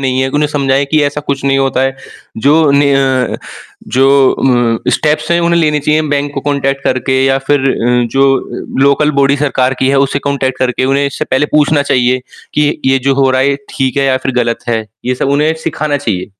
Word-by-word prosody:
नहीं 130 -1 0
हैं, 130 - 0
उन्हें 150 +2 0
समझाएँ 140 -1 0
कि 155 - +3
ऐसा 145 +1 -2
कुछ 140 -2 -4
नहीं 135 0 +2
होता 135 -1 0
है। 135 0 -1 0.5
जो 155 0 +4
ने 140 0 +3
अ, 130 -2 0 0.5
जो 135 +1 +2 0.8
अ, - - +2
स्टेप्स 150 +2 -1
हैं, 170 - +2
उन्हें 170 0 +2
लेनी 150 -2 +1
चाहिए 150 +2 +1
बैंक 145 0 -1
को 135 - -2
कॉन्टैक्ट 135 -1 -2
करके, 130 +1 0
या 135 0 +2
फिर 145 -1 +3
अ, 125 +1 +1
जो 135 0 +3 0.6
लोकल 140 +2 +3
बॉडी 140 +1 +3
सरकार 135 -2 0
की 130 - +1
है, 140 - +2
उससे 140 0 +1
कॉन्टैक्ट 130 -2 -2
करके 130 0 0
उन्हें 140 +1 +1
इससे 140 - -4
पहले 135 +3 +1
पूछना 150 0 +2
चाहिए 125 -2 +1 0.4
कि, 150 0 0
ये 135 0 +3
जो 135 +1 0
हो 135 -1 +2
रहा 130 0 +1
है, 135 - +2
ये 140 - -1 0.2
ठीक 135 -1 -1
है, 140 - +1
या 130 -1 +2
फिर 130 - -1
गलत 115 +1 -4
है? 115 -2 -1 0.2
ये 125 +1 0
सब 125 - -2
उन्हें 155 +2 +2
सिखाना 155 -2 -2
चाहिए। 110 -9 -3
135 Hz, 215 wpm, -12 LUFS, 130-145 Hz, 0.8 s, जो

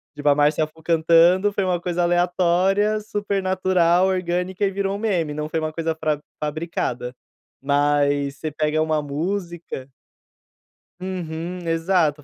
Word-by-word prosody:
tipo 145 0 -4
a 145 - +7
Márcia 150 +1 +3
Fu 160 +1 -20
cantando, 170 +4 +4
foi 200 - 0
uma 180 -2 0
coisa 175 0 -2
aleatória, 180 +4 +2
super 205 -1 -2
natural, 185 -1 +3
orgânica 185 +1 -1
e 195 - 0
virou 195 0 -1
um - - -5
meme, 180 -9 0
não 150 0 -3
foi 160 +1 -2
uma 155 0 -2
coisa 165 0 -2
fra 155 -2 -1 0.2
fabricada. 150 -5 -3 0.5
Mas 145 0 +1
você 155 0 -4
pega 155 +1 0
uma 155 -1 +1
música 170 -1 -4 1.1
Uhum. 180 -1 -5
Exato, 165 -3 +1
170 Hz, 140 wpm, -22 LUFS, 155-185 Hz, 1.1 s, a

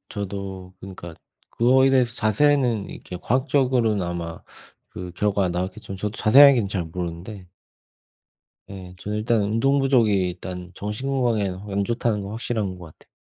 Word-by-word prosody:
저도 95 -2 -6
그니까 90 -3 -9 0.4
그거에 130 +3 +4
대해서 125 -3 +2
자세히는 120 -1 +2
이렇게 90 - -8
과학적으로는 125 -4 +1
아마 85 -1 -5 0.5
그 90 -1 -8
결과가 100 -1 0
나왔겠지만 95 +2 -4
저도 105 +2 -4
자세하게는 130 -2 +6
잘 95 -2 -2
모르는데 90 +4 -6 1.2
예. 95 -2 -9
저는 105 +2 -4
일단 110 0 +1
운동 135 +7 +1
부족이 125 -6 +3
일단 90 -1 -3
정신 105 +6 -4
건강에는 110 -8 0
안 100 0 -1
좋다는 115 -2 -1
건 100 - -7
확실한 110 -4 -3
것 85 -3 -13
같아. - - -24
105 Hz, 345 characters per minute, -23 LUFS, 95-120 Hz, 1.2 s, 자세하게는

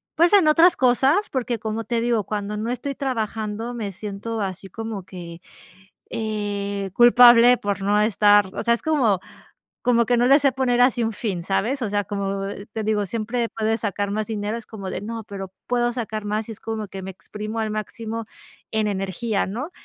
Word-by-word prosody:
pues, 340 +4 +4
en 390 -6 +6
otras 330 +3 +6
cosas, 270 - +3
porque, 245 -3 -2
como 220 +1 -3
te 230 +1 -1
digo, 235 -2 +1
cuando 210 +1 -4
no 225 +3 -2
estoy 275 +3 -4
trabajando, 225 -3 -3
me 215 -4 -4
siento 210 +3 -5
así 195 0 -4
como 220 -1 -6
que, 175 -2 -9 0.7
eh, 205 -2 -3
culpable 240 +1 +7
por 200 -2 -3
no 205 +1 +3
estar 205 -1 +4
o - - -3
sea, 235 - +3
es - - -10
como 255 - +2 0.6
como 235 -1 +3
que 245 +1 +2
no 240 +1 +3
le 275 +2 +7
sé 275 -1 +3
poner 245 -2 +1
así 245 -1 +3
un 225 0 -1
fin, 195 -6 -3
¿sabes? 225 +9 -1
O 225 - -1
sea, 205 0 0
como 200 -1 -3 0.3
te 220 - -3
digo, 210 -1 +1
siempre 230 +3 -2
puedes 225 0 -1
sacar 205 -1 -2
más 215 0 -2
dinero, 215 0 -3
es 230 - -9
como 200 -4 -7
de: - - -4
"No, 225 +2 -5
pero 195 -2 -7
puedo 240 0 +1
sacar 220 -3 -4
más", 215 +2 -2
y - - -4
es 220 - -14
como 220 -2 -4
que 195 0 -7
me 190 - -5
exprimo 215 +4 -6
al 215 -1 -2
máximo 225 +1 -5 0.5
en 220 -1 +1
energía, 200 +2 -1
¿no? 250 - -5
220 Hz, 195 wpm, -23 LUFS, 205-240 Hz, 0.7 s, culpable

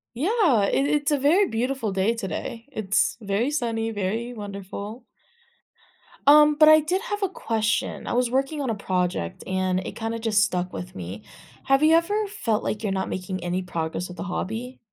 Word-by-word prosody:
Yeah. 330 - +3
It 275 +7 +1
it's 295 -1 +1
a 290 - +3
very 340 +9 +4
beautiful 235 - -2
day 195 +5 +1
today. 230 +3 -5
It's 205 -2 +1
very 210 +6 0
sunny, 230 -6 -1
very 220 +5 -2
wonderful. 205 +2 -7 1.2
Um, 300 +1 +7
but 305 +1 +6
I 310 0 +8
did 360 +6 -1
have 415 -4 -4
a 390 - +2
question. 225 - -1
I - - -2
was 245 0 +1
working 270 +4 0
on 265 - -1
a 225 - 0
project, 180 - -2
and 185 0 0
it - - -7
kinda 225 0 -3
just 220 -2 +3
stuck 180 0 -2
with 180 - -7
me. 95 +3 -7 0.4
Have 270 +1 +3
you 315 +1 +6
ever 415 +6 +1
felt 240 - -1
like 215 - -3
you're 205 -3 -1
not 190 0 -2
making 185 0 -4
any 180 +1 -1
progress 170 0 -3
with 180 -1 -11
a - - -3
hobby? 225 +7 -4
225 Hz, 185 wpm, -24 LUFS, 190-285 Hz, 1.2 s, I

